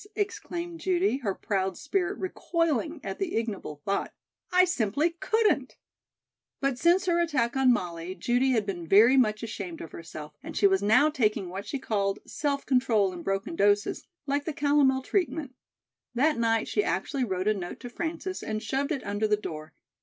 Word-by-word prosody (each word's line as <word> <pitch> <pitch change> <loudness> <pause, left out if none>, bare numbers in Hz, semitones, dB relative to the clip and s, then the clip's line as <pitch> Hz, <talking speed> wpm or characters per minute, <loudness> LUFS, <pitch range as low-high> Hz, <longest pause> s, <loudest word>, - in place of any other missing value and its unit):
exclaimed 350 -4 -3
Judy, 370 -4 +1
her 205 -8 -2
proud 190 -2 -1
spirit 375 +6 -1
recoiling 330 -4 -1
at 195 -1 -5
the 375 -3 -2
ignoble 200 -10 -3
thought. 200 0 -1 0.4
"I 365 0 +6
simply 295 - +1
couldn't." 440 -1 +1 0.8
But 275 -3 0
since 350 +5 +4
her 345 -2 +2
attack 260 -8 0
on 265 -1 +5
Molly, 175 -4 -2
Judy 245 +5 +1
had 220 -4 +1
been 175 -4 -5
very 220 +9 +7
much 215 -4 +2
ashamed 195 -6 -5
of 165 - -8
herself, 155 -2 -9
and - - -7
she - - +3
was 190 -1 +4
now 220 +9 +4
taking 210 - 0
what 195 +3 -6
she 285 - -2
called 200 -6 -1
"self 285 -2 -2
control 225 -7 +2
in 175 - -7
broken 195 - -2
doses," 205 -4 +2 0.2
like 285 +1 -1
the 320 - -2
calomel 285 -2 +3
treatment; 320 -6 -1 0.6
that 300 +6 +3
night 225 -1 +1
she 415 - +1
actually 275 -8 -1
wrote 190 -3 -2
a 215 - +4
note 180 -4 -6
to 245 - -6
Frances 340 +5 -4
and 215 0 -3
shoved 275 +2 -1
it 280 -4 -2
under 205 +2 0
the 210 0 +2
door. 155 -6 -7
245 Hz, 175 wpm, -28 LUFS, 200-310 Hz, 0.8 s, very